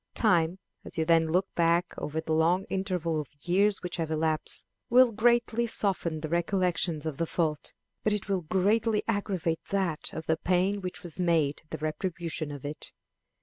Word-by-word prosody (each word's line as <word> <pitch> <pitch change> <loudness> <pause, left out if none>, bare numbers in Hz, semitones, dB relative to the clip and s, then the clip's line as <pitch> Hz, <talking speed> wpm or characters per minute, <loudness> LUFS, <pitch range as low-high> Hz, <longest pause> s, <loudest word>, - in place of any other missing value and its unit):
Time, 175 -5 +3 0.3
as - - -9
you 160 - +1
then 165 0 +4
look 180 +4 +2
back 170 +1 +2
over 155 +2 -3
the 160 0 -2
long 170 +4 +3
interval 180 -5 -1
of 145 - -11
years 195 +6 +2
which 180 0 -3
have 165 -2 -2
elapsed, 155 0 0 0.2
will 250 0 +6
greatly 235 +1 +2
soften 175 -7 -1
the 155 - -3
recollection 170 -2 0
of 150 -3 -4
the 165 - -1
fault, 155 -4 -2 0.3
but 215 - +2
it 210 -1 -2
will 195 -2 0
greatly 210 +6 +1
aggravate 190 -6 -1
that 190 -6 0
of 160 - -6
the 160 - +1
pain 185 +4 +1
which 180 -1 -5
was 175 0 -8
made 165 -5 +2
the - - -4
retribution 160 0 -3
of 145 -1 -8
it. 150 +1 -5
175 Hz, 175 wpm, -28 LUFS, 160-195 Hz, 0.3 s, will